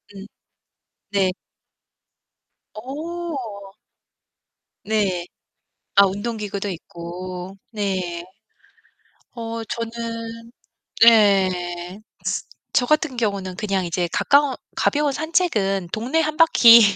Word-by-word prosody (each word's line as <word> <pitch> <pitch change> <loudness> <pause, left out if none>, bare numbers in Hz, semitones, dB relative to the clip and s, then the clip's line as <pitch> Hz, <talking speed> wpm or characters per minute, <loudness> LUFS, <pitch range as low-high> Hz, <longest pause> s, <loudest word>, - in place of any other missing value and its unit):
음. 195 0 -8 0.9
네. 190 -2 +2 1.4
어. 265 - -6 1.1
네. 200 -5 0 0.7
아 200 0 +8
운동 205 +5 -3
기구도 205 -1 -4
있고 180 +1 -7
네. 185 -5 -2 1.1
어 230 -1 -5
저는 230 0 -5 0.5
네. 185 -4 +4 0.8
저 250 - +4
같은 305 -4 +1
경우는 200 -5 -1
그냥 195 -3 -1
이제 175 0 -1
가까운, 280 -1 +3 0.2
가벼운 295 -1 +2
산책은 220 - 0
동네 255 +9 0
1 310 -1 -2
바퀴 240 -8 +8
210 Hz, 140 characters per minute, -22 LUFS, 190-240 Hz, 1.4 s, 아